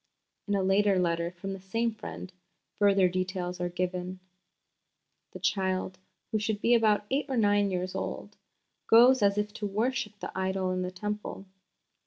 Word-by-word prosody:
In 205 - +1
a 195 - +1
later 195 +1 +3
letter 170 -1 0
from 180 +2 -6
the 195 - -7
same 225 +5 -1
friend 185 -3 -8 0.5
further 200 -2 +5
details 180 0 -3
are 175 - -1
given: 180 +1 -3 1.1
"The 185 - -8
child, 190 -1 -1 0.3
who 215 - +1
should 210 0 -1
be 235 +3 +3
about 215 -3 +3
eight 280 +2 0
or 260 - -1
nine 205 -2 +3
years 185 0 -2
old, - - -5 0.5
goes 245 +2 +7
as 200 0 +3
if 210 0 -1
to 215 -1 -3
worship 225 +2 -2
the - - -7
idol 190 0 -1
in 185 0 -1
the 180 - -2
Temple. 210 +1 -5
195 Hz, 165 wpm, -29 LUFS, 185-210 Hz, 1.1 s, goes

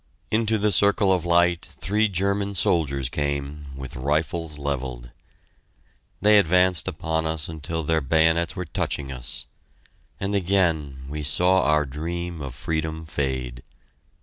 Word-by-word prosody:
Into 110 0 +2
the 105 0 +1
circle 100 +1 +4
of 90 -2 -1
light 85 0 +3
three 105 +3 +1
German 100 +1 0
soldiers 70 -7 +2
came, 70 +1 -3
with 65 -1 -8
rifles 75 +3 -1
levelled. 65 -4 -4 1.1
They 105 +1 +6
advanced 90 -2 +3
upon 80 0 -1
us 80 -2 -3
until 80 +1 -4
their 80 +1 +1
bayonets 80 +3 +2
were 90 - -4
touching 70 -3 -3
us. - - -6 0.7
And 100 +1 -2
again 85 -8 +1
we 75 +2 -5
saw 90 +6 +3
our 75 -1 +3
dream 85 +4 -4
of 65 -4 -6
freedom 80 0 -3
fade! 65 -5 -3
80 Hz, 130 wpm, -24 LUFS, 70-90 Hz, 1.1 s, They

